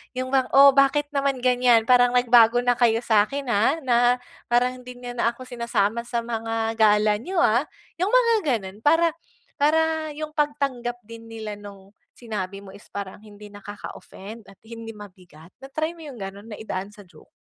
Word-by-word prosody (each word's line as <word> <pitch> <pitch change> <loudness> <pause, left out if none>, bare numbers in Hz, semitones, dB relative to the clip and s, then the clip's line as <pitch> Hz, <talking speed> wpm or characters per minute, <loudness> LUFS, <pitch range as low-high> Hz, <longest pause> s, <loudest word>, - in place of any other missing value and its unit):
'Yon 255 +1 -4
bang, 260 -2 +2
oh 275 0 +9
bakit 280 +2 +2
naman 275 -3 -1
ganyan, 245 -2 +4
parang 245 0 +4
nagbago 245 -1 +5
na 245 - +3
kayo 230 0 +2
sa'kin, 220 +6 +1
ah, 220 +9 +2
na 240 -2 +2 0.5
parang 250 +1 +1
hindi 250 0 -11
niyo 245 0 -8
na 235 -1 -1
ako 255 - -11
sinasama 235 -2 -2
sa 235 -1 -2
mga 225 -1 -3
gala 210 -1 +3
niyo 370 +10 -7
ah. 240 +7 +2 0.3
'Yong 380 +3 0
mga 470 -2 +4
ganon 205 -5 -2
para 330 +6 +3 0.5
para 315 +1 +1
yung 310 0 -6
pagtanggap 275 -6 -2
din 230 +1 -12
nila 220 -2 -7
nung 200 -1 -13 0.2
sinabi 200 -4 -6
mo 190 - -12
is 205 - -15
parang 200 -1 -7
hindi 210 -1 -14
nakaka-offend 205 +1 -11
at 195 - -15
hindi 225 -1 -9
mabigat. 180 -5 -15
Na-try 310 +4 -4
mo 325 -3 -12
'yong 270 - -9
ganun, 200 +2 -8
na 210 - -8
idaan 200 -1 -6
sa 205 - -13
joke? 180 - -20
235 Hz, 175 wpm, -23 LUFS, 210-265 Hz, 0.5 s, oh